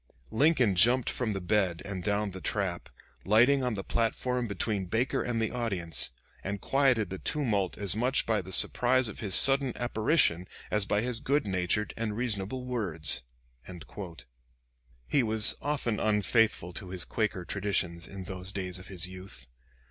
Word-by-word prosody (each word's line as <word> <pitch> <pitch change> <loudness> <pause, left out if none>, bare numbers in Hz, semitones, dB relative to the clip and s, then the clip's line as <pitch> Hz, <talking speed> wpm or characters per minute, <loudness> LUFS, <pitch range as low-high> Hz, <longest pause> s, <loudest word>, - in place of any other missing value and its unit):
Lincoln 130 -4 +3
jumped 120 +7 +4
from 115 -4 -2
the 95 - -3
bed 90 -2 0
and 95 -3 -6
down 105 0 -1
the 95 0 -9
trap, 95 -5 -3 0.3
lighting 125 +7 +4
on 125 -3 -1
the 100 - -5
platform 120 +2 -1
between 100 -1 -3
Baker 115 +7 0
and 120 -2 -2
the 110 -1 -1
audience, 95 - -2 0.3
and 100 +1 -4
quieted 130 -6 +1
the 95 - -5
tumult 105 -11 -1
as 100 -2 0
much 125 +4 +1
by 110 -3 0
the 95 +1 -11
surprise 125 +6 +5
of 110 - -7
his 100 -4 +1
sudden 135 -2 +5
apparition 110 - +1 0.2
as 105 -2 +1
by 105 - +1
his 120 -1 -1
good 140 0 0
natured 95 +2 -1
and 110 -2 -4
reasonable 120 +1 -2
words." 90 -12 0 0.5
[Lamon 90 -2 -10
p. - - -11
396.] 85 -9 -10 0.8
He 145 - +2
was 110 -2 +6
often 140 -7 -2
unfaithful 105 -3 +1
to 90 +1 -7
his 90 -1 -4
Quaker 105 -5 -2
traditions 90 -3 -2
in 95 -1 -8
those 95 0 -5
days 95 -2 -5
of 90 - -12
his 95 -2 -3
youth. 90 -8 -11
105 Hz, 170 wpm, -29 LUFS, 95-120 Hz, 0.8 s, was